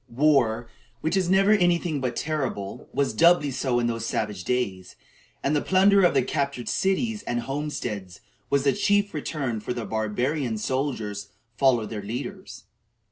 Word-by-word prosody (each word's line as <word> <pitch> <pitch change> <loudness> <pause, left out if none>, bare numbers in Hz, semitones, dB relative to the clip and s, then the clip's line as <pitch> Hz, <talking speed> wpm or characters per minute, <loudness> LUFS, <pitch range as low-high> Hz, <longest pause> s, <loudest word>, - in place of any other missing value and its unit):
War, 125 -4 +2 0.3
which 160 +3 0
is 185 -2 +1
never 195 +2 +4
any 175 -5 +4
thing 160 -5 -3
but 125 -2 -2
terrible, 135 -11 -3
was 140 - 0
doubly 170 -4 +4
so 125 -1 0
in 120 - 0
those 115 -1 -2
savage 105 -5 -2
days, 100 -8 -2 0.5
and 145 +2 +1
the 145 - +2
plunder 195 +1 +4
of 175 - +4
the 135 - +4
captured 140 -3 -2
cities 210 +3 0
and 120 0 -1
homesteads 125 -9 -4 0.3
was 140 -1 +2
the 140 -1 +3
chief 205 +6 +1
return 140 -6 -3
for 105 - -17
which 125 - -1
the 115 -2 -4
barbarian 115 +4 -1
soldiers 110 -5 -2 0.3
followed 120 -6 +2
their 105 -2 -4
leaders. 130 - -6
135 Hz, 165 wpm, -25 LUFS, 115-160 Hz, 0.5 s, never